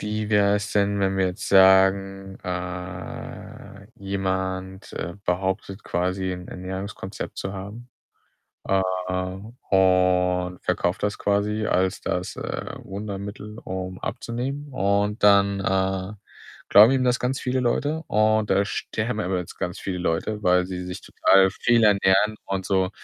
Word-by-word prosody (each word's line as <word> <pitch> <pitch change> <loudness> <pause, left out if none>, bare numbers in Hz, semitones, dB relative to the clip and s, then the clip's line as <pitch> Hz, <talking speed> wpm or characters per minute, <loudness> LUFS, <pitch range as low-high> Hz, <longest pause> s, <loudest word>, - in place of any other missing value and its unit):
wie 105 0 -3
wär's 105 0 +2
denn, 100 0 +1
wenn 95 0 +1
wir 95 -1 +2
jetzt 90 +3 -4
sagen, 95 0 +4
äh, 90 +2 -7
jemand, 95 -1 -3
äh, 85 - -5
behauptet 95 +3 -2
quasi, 95 +2 -1
'n 90 0 -7
Ernährungskonzept 95 +1 -6
zu 95 - -4
haben, 105 +6 -8 0.8
äh, 95 0 +3 0.9
und 90 -1 +3
verkauft - - -1
das 105 0 0
quasi 105 +1 0
als 95 +1 +1
das, 90 0 -3
äh, - - -5
Wundermittel, 100 +1 -7
um 95 0 -5
abzunehmen 135 +5 -4
und 100 -1 0
dann, 100 -1 +5
äh, 95 0 0 0.5
glauben 105 +4 +8
ihm 130 -1 +2
das 125 0 +2
ganz 130 +2 -1
viele 130 0 -1
Leute, 145 +6 0
und 110 0 +2
da 100 +1 +3
sterben 110 +1 -3
aber 90 0 -1
jetzt 90 - -6
ganz 90 +2 -4
viele 95 -2 -4
Leute, 105 +5 -2
weil 90 0 +4
sie 90 -1 -5
sich 90 0 -6
total 95 0 +4
fehlernähren 105 -2 +3
und 95 -1 -3
so 95 -1 +1
95 Hz, 135 wpm, -24 LUFS, 95-105 Hz, 0.9 s, glauben